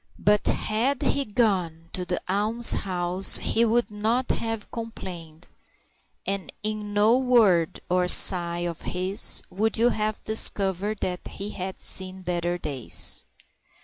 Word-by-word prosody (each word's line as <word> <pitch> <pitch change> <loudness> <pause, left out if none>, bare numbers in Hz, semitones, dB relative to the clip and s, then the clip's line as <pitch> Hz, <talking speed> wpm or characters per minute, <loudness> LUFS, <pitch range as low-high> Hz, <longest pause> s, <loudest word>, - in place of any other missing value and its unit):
But 210 0 +2
had 245 +6 0
he 280 - 0
gone 185 -8 -1
to 180 - -4
the 180 - -2
almshouse 195 -3 +2
he 230 - +1
would 235 -1 +1
not 225 +5 -1
have 225 -2 -4
complained, 180 -8 -8 0.8
and 195 -1 -3
in 210 -1 -4
no 215 +4 +3
word 220 -11 +3
or 180 0 +1
sigh 175 -2 +4
of 170 -2 -5
his 185 +2 0
would 220 +4 0
you 235 +2 +4
have 215 -2 -2
discovered 205 -1 0
that 180 -1 -4
he 200 +2 -7
had 190 0 -6
seen 185 0 -2
better 175 0 -2
days. 140 -8 -1
200 Hz, 130 wpm, -25 LUFS, 180-220 Hz, 0.8 s, sigh